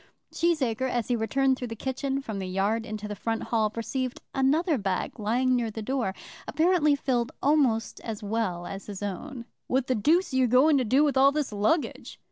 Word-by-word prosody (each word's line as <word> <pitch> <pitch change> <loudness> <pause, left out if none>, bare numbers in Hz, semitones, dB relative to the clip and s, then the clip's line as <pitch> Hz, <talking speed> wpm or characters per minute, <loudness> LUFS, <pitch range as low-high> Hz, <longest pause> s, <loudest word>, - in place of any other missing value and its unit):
Cheesacre, 260 -7 +1
as 240 -2 -2
he 245 - +2
returned 265 +4 +1
through 250 - -4
the 225 - -6
kitchen 270 +3 -3
from 215 -6 -5
the 190 - -4
yard 200 +5 0
into 215 0 -5
the 210 - -5
front 225 +3 -2
hall, 220 -2 +1
perceived 255 +3 -3
another 300 +5 +2
bag 195 +3 -2
lying 250 +5 +1
near 235 -2 0
the 220 0 -6
door, 240 -5 -1 0.3
apparently 315 -1 +3
filled 250 -4 -1
almost 270 -6 +2
as 220 -2 -6
well 200 -5 -2
as 195 +2 -7
his 205 -1 -6
own. 235 +6 -5 0.2
"What 260 0 +1
the 260 - +1
deuce 305 - +2
are - - +1
you 255 -1 +4
going 270 +5 +5
to - - +1
do 260 +6 +3
with 285 -3 +1
all 275 +1 +6
this 295 -4 -2
luggage?" 215 +10 -1
245 Hz, 200 wpm, -27 LUFS, 215-275 Hz, 0.3 s, all